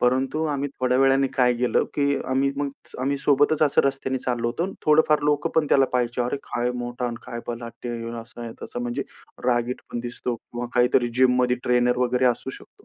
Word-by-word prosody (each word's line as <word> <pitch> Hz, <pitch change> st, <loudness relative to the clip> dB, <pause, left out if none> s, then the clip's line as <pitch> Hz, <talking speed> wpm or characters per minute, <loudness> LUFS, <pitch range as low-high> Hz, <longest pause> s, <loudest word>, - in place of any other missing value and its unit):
परंतु 130 Hz, +5 st, +1 dB
आम्ही 145 Hz, -1 st, -1 dB
थोड्या 125 Hz, 0 st, +2 dB
वेळाने 135 Hz, 0 st, +4 dB
काय 125 Hz, -1 st, +4 dB
केलं 125 Hz, +1 st, +2 dB
की 140 Hz, -1 st, +2 dB
आम्ही 135 Hz, +1 st, +2 dB
मग 145 Hz, 0 st, -1 dB, 0.3 s
आम्ही 140 Hz, +2 st, 0 dB
सोबतच 145 Hz, +2 st, +3 dB
असं 145 Hz, -2 st, +4 dB
रस्त्याने 135 Hz, -1 st, -1 dB
चाललो 120 Hz, -2 st, -2 dB
होतो. 165 Hz, +9 st, -1 dB, 0.2 s
थोडंफार 150 Hz, 0 st, +5 dB
लोकं 145 Hz, 0 st, +1 dB
पण 160 Hz, -2 st, +3 dB
त्याला 135 Hz, -1 st, +5 dB
पाहायचे. 125 Hz, -1 st, 0 dB
अरे, 125 Hz, +3 st, -1 dB
काय 120 Hz, +1 st, -1 dB
मोठा 120 Hz, +1 st, -3 dB
आणि 120 Hz, -, -4 dB
काय 120 Hz, -, -5 dB
बलाढ्य! 120 Hz, 0 st, -6 dB
आहे, 115 Hz, 0 st, -5 dB
असं 115 Hz, 0 st, -12 dB
आहे, 115 Hz, -1 st, -6 dB
तसं. 120 Hz, -, -5 dB
म्हणजे 120 Hz, 0 st, -2 dB, 0.4 s
रागीट 120 Hz, 0 st, +1 dB
पण 120 Hz, -, -2 dB
दिसतो 120 Hz, 0 st, -4 dB
किंवा 120 Hz, +1 st, -7 dB
काहीतरी 125 Hz, 0 st, +3 dB
जिममध्ये 125 Hz, -1 st, +4 dB
ट्रेनर 125 Hz, 0 st, +3 dB
वगैरे 125 Hz, 0 st, +2 dB
असू 125 Hz, +2 st, 0 dB
शकतो. 410 Hz, -, -13 dB
125 Hz, 190 wpm, -24 LUFS, 120-140 Hz, 0.4 s, थोडंफार